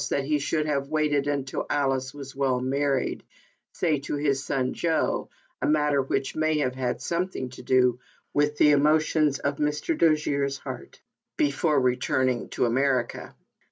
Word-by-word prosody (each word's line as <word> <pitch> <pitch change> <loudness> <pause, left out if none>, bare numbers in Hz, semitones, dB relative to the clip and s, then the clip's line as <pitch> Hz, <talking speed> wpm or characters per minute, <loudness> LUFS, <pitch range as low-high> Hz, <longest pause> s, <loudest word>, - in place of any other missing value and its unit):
that 140 - 0
he 150 +1 +1
should 155 +2 -1
have 140 -2 -1
waited 150 -2 +1
until 140 -2 -2
Alice 135 -2 0
was 140 -1 -10
well 135 -2 +1
married 135 +1 -1 0.5
(say 155 -5 0
to 140 - -4
his 140 -2 0
son 130 -2 -1
Joe, 170 - 0 0.3
a - - +1
matter 150 -2 +2
which, 135 0 -2
may 155 0 +1
have 130 -4 0
had 125 -1 -2
something 170 -6 -2
to 130 - -11
do 125 -1 +3 0.3
with 145 0 +1
the 150 - +6
emotions 150 0 +3
of 140 0 -2
Mr. 150 - -1
Dojere's 145 - +1
heart) - - -9 0.4
before 170 - +2
returning 130 0 0
to - - 0
America. 125 0 0
140 Hz, 155 wpm, -26 LUFS, 130-150 Hz, 0.5 s, the